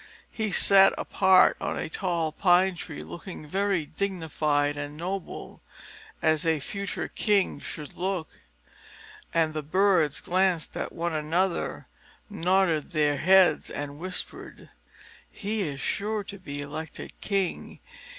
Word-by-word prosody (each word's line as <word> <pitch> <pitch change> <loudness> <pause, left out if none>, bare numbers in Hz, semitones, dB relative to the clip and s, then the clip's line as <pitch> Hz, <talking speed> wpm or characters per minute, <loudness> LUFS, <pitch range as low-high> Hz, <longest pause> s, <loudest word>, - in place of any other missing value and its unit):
He 220 -3 -2
sat 195 +1 +6
apart 190 -1 +4
on - - -2
a - - -3
tall 170 -2 -1
pine 185 +3 +4
tree, 165 -3 -7
looking 175 -2 -9
very 190 0 0
dignified 155 -5 -1
and 145 +1 -6
noble, 185 +3 -6 0.6
as 155 -1 +3
a 160 -2 +2
future 200 +8 -4
king 205 -3 +1
should 150 -4 -8
look. 180 -3 -2 1.0
And 160 -2 +1
the 155 - -2
birds 170 -1 +2
glanced 185 -2 0
at - - -3
one 170 0 -3
another, 165 +4 -1 0.5
nodded 180 -4 +1
their 150 -2 +2
heads, 185 -2 +4
and 145 0 -5
whispered, 185 +1 -6 0.6
"He 210 +1 -2
is 140 -1 -7
sure 210 +5 -2
to 200 0 -9
be 145 -6 -6
elected 150 +2 -7
king. 195 -3 -2
175 Hz, 125 wpm, -27 LUFS, 155-195 Hz, 1.0 s, sat